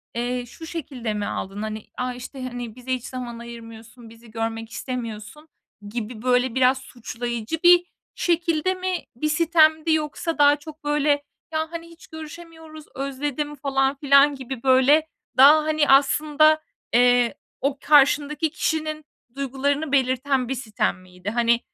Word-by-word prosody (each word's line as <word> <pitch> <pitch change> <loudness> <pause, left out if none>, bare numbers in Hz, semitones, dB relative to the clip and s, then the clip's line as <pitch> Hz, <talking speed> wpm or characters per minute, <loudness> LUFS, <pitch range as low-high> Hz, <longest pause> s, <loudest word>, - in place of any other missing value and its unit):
eee, 245 +1 -2
şu 290 +7 -11
şekilde 265 -9 -5
mi 205 -1 -3
aldın? 195 +1 -5
Hani, 215 0 -5
"A!", 250 0 -2
işte, 255 +2 -9
hani, 245 -3 -6
"Bize 255 +1 -4
hiç 250 -2 -4
zaman 245 -2 -6
ayırmıyorsun, 230 0 -11
bizi 225 0 -16
görmek 225 0 -4
istemiyorsun." 235 +4 -6 0.4
gibi, 225 0 -5
böyle, 250 0 +1
biraz 260 0 +4
suçlayıcı 240 0 -5
bir 350 0 +7 0.3
şekilde 340 0 +1
mi 370 0 -2 0.2
bir 305 +6 -1
sitemdi 315 0 +3
yoksa 310 +1 -2
daha 290 0 +6
çok, 300 +1 -12
böyle, 295 0 0 0.4
"Ya, 315 +1 -2
hani, 335 0 -7
hiç 335 0 -16
görüşemiyoruz, 315 0 -11
özledim." 285 +2 -3
falan 270 -1 0
filan 280 0 +4
gibi, 260 -2 -7
böyle, 270 +4 +4 0.3
daha, 295 +4 +8
hani, 310 -1 +1
aslında, 300 +3 +4 0.3
eee, 245 +1 +4 0.3
o 275 0 0
karşındaki 295 +2 +3
kişinin 310 -2 -2 0.3
duygularını 275 +2 -1
belirten 260 -1 +1
bir 265 - -1
sitem 215 -6 -2
miydi? 180 +1 -8
Hani, 235 +1 +2
270 Hz, 140 wpm, -23 LUFS, 240-310 Hz, 0.4 s, daha